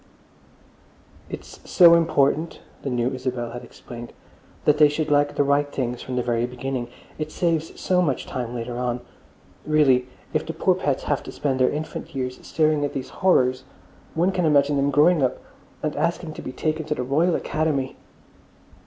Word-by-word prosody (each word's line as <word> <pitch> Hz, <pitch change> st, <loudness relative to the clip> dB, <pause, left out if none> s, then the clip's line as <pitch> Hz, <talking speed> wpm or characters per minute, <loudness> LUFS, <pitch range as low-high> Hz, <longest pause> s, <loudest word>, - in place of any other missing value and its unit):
"It's -, -, -9 dB
so 170 Hz, -2 st, +8 dB
important," 160 Hz, -1 st, +2 dB, 0.2 s
the -, -, -3 dB
new 125 Hz, 0 st, 0 dB
Isabel 125 Hz, -2 st, -3 dB
had 120 Hz, +1 st, -7 dB
explained, 120 Hz, 0 st, -10 dB, 0.5 s
"that 150 Hz, 0 st, +4 dB
they 150 Hz, -1 st, +7 dB
should 150 Hz, +1 st, -2 dB
like 145 Hz, 0 st, +3 dB
the -, -, +3 dB
right 145 Hz, +1 st, +1 dB
things 125 Hz, -3 st, -3 dB
from 130 Hz, -, -5 dB
the 125 Hz, -, 0 dB
very 120 Hz, 0 st, 0 dB
beginning. 125 Hz, 0 st, -4 dB, 0.3 s
It 155 Hz, 0 st, -3 dB
saves 165 Hz, -2 st, -1 dB
so 180 Hz, -1 st, +2 dB
much 145 Hz, -7 st, 0 dB
time 125 Hz, -1 st, -4 dB
later 120 Hz, +1 st, -4 dB
on. 125 Hz, -1 st, -1 dB, 0.6 s
Really, 135 Hz, -5 st, +3 dB, 0.3 s
if 155 Hz, -, +1 dB
the 165 Hz, -, -5 dB
poor 185 Hz, +3 st, +2 dB
pets 145 Hz, -7 st, -1 dB
have 145 Hz, -, 0 dB
to -, -, -9 dB
spend 135 Hz, -3 st, -1 dB
their 130 Hz, -, +4 dB
infant 155 Hz, -1 st, -5 dB
years 130 Hz, -1 st, -3 dB
staring 155 Hz, -2 st, +2 dB
at 145 Hz, -, -2 dB
these 130 Hz, -1 st, -4 dB
horrors, 130 Hz, -8 st, +3 dB, 0.5 s
one 175 Hz, +4 st, +2 dB
can 185 Hz, -2 st, -1 dB
imagine 145 Hz, -1 st, +4 dB
them 140 Hz, 0 st, +2 dB
growing 150 Hz, +4 st, +4 dB
up 130 Hz, -1 st, +1 dB, 0.5 s
and 155 Hz, -1 st, -1 dB
asking 170 Hz, -1 st, -1 dB
to -, -, -8 dB
be -, -, -6 dB
taken 155 Hz, +4 st, -2 dB
to 150 Hz, -, 0 dB
the 125 Hz, -, -2 dB
Royal 160 Hz, +7 st, +2 dB
Academy." 150 Hz, -4 st, -1 dB
145 Hz, 180 wpm, -24 LUFS, 125-155 Hz, 0.6 s, so